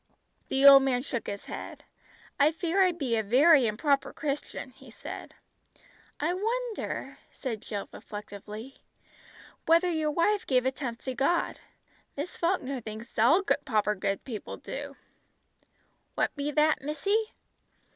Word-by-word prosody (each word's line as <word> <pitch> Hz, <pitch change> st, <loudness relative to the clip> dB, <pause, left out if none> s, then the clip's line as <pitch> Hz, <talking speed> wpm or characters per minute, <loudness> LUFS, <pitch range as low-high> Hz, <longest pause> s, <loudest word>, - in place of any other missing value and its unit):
The 270 Hz, +1 st, +2 dB
old 275 Hz, -1 st, +11 dB
man 255 Hz, -2 st, +1 dB
shook 240 Hz, -4 st, -4 dB
his 200 Hz, 0 st, -5 dB
head. -, -, -8 dB, 0.6 s
"I 290 Hz, +2 st, +5 dB
fear 340 Hz, +3 st, 0 dB
I 370 Hz, -1 st, +5 dB
be 275 Hz, -9 st, -1 dB
a -, -, +2 dB
very 260 Hz, +5 st, +5 dB
improper 275 Hz, +6 st, +1 dB
Christian," 285 Hz, -2 st, -4 dB
he 265 Hz, +1 st, -16 dB
said. 225 Hz, -, -9 dB, 0.8 s
"I 315 Hz, +4 st, +1 dB
wonder," 455 Hz, +4 st, -3 dB
said 230 Hz, -6 st, -5 dB
Jill 205 Hz, -2 st, -5 dB
reflectively, 210 Hz, +4 st, -9 dB, 0.9 s
"whether 335 Hz, +2 st, +4 dB
your 315 Hz, -2 st, 0 dB
wife 365 Hz, +7 st, +1 dB
gave 255 Hz, -2 st, +2 dB
a 260 Hz, -, +2 dB
tenth 245 Hz, -4 st, -6 dB
to 260 Hz, -, -3 dB
God. 275 Hz, +7 st, 0 dB, 0.6 s
Miss 300 Hz, +6 st, -4 dB
Falkner 280 Hz, -7 st, -1 dB
thinks 220 Hz, +1 st, -8 dB
all 305 Hz, -, +5 dB, 0.2 s
proper 215 Hz, -5 st, +1 dB
good 195 Hz, 0 st, -2 dB
people 225 Hz, -6 st, -6 dB
do." -, -, -7 dB, 1.2 s
"What -, -, 0 dB
be 285 Hz, 0 st, -2 dB
that, 305 Hz, +1 st, +2 dB
missy?" 395 Hz, +10 st, -1 dB
275 Hz, 135 wpm, -28 LUFS, 235-330 Hz, 1.2 s, old